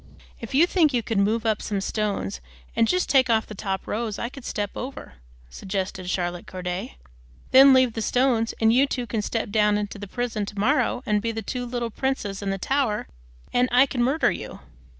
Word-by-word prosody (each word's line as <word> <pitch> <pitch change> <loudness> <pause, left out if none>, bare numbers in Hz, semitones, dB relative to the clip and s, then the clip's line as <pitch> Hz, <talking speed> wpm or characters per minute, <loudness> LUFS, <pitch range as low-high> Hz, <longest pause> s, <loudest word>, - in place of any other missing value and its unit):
"If 230 +2 -6
you 315 +5 +6
think 330 -5 +2
you 235 - +1
could 220 -2 -1
move 220 +3 +1
up 220 -2 +1
some 205 -2 -2
stones 195 - -2 0.3
and 225 - +3
just 365 +6 +1
take 260 -2 +4
off 220 -1 +3
the - - -9
top 195 -1 -3
rows, 220 -1 -3
I 235 - -3
could 270 0 -11
step 205 -1 -3
out - - -5
over," 255 - -7 0.4
suggested 190 - -4
Charlotte 175 -1 -2
Corday. 180 - -5 0.5
"Then 270 +1 +9
leave 260 -3 +4
the 225 - -3
stones, 240 -1 +1
and 225 0 +4
you 270 +3 +4
two 250 -3 -3
can 220 -1 -2
step 220 0 -3
down 210 -1 +3
into 205 0 -4
the 205 - -7
prison 225 -2 -3
to 205 - -9
morrow 255 +2 +1
and 210 -2 +1
be 230 +1 -1
the 225 0 -5
two 245 +4 -4
little 240 -1 -3
princes 210 -6 -2
in 200 - -2
the 195 - -1
Tower, 255 - -1 0.4
and 250 +1 +3
I 250 +2 +6
can 255 -2 -3
murder 270 +6 +2
you." - - -7
225 Hz, 210 wpm, -24 LUFS, 205-255 Hz, 0.5 s, Then